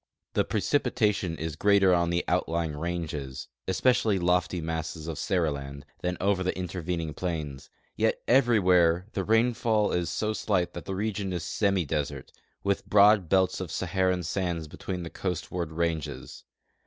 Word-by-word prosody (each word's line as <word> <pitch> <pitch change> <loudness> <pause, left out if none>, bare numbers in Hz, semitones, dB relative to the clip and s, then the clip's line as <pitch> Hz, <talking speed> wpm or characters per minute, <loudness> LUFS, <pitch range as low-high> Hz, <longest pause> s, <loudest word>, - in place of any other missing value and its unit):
The - - +3
precipitation 105 - 0
is 80 -2 -4
greater 100 +1 +4
on 85 -1 +2
the 85 0 0
outlying 80 -2 0
ranges, 75 -5 -4 0.2
es})ecially 115 +2 +2
the 85 - -2
lofty 90 -1 +2
masses 80 0 -4
of 80 -3 -4
Seriland, 70 -7 -1 0.2
than 90 0 -2
over 100 0 +1
the 95 0 -1
intervening 90 -3 -3
plains; 75 -7 -4 0.3
yet - - +1
everywhere 90 -9 +4
tlie 95 - -2
rainfall 110 -1 +2
is 85 -2 0
so 105 +7 -1
slight 95 -5 0
that 85 - -7
the 95 - -3
region 100 -1 -2
is 90 -2 -3
semidesert, 80 -9 -1 0.3
with 100 -1 -1
broad 100 -3 +6
belts 95 -1 +2
of 90 - -4
Saharan 95 -1 0
sands 85 -2 -2
between 90 +4 -5
the 85 - -7
coast 90 -3 -4
ward 85 -3 -3
ranges. 80 -3 -3
90 Hz, 150 wpm, -28 LUFS, 80-100 Hz, 0.3 s, broad